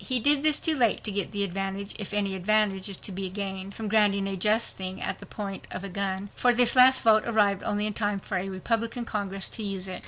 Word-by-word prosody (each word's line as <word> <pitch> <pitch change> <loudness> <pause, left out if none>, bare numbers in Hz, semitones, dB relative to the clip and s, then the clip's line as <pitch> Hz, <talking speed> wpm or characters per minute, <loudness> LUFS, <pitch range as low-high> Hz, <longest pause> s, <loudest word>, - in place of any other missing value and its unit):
He 255 -2 +4
did 290 +4 +6
this 305 -1 +4
too 320 - -1
late 240 -6 +1
to 215 - +2
get 200 0 -1
the 205 -1 -1
advantage—if 195 +1 -4
any 205 -2 -1
advantage 195 0 +1
is 195 - -5
to - - -8
be 190 0 -4
gained 195 0 -5
from 220 - -6
granting 205 -2 +2
a 195 - -3
just 215 +4 +1
thing 185 0 -5
at - - -4
the - - -12
point 200 -2 -7
of 185 - -7
a 200 - -5
gun—for 200 +5 -1
this 245 +1 +5
last 260 +1 +6
vote 220 -2 +5
arrived 205 -4 +1
only 205 0 -1
in 215 - -2
time 205 -1 -2
for 190 0 -5
a 190 +2 -4
Republican 230 +5 -3
Congress 195 -3 -2
to - - -7
use 195 -2 -3
it. 185 -1 -6
200 Hz, 240 wpm, -26 LUFS, 195-220 Hz, -, did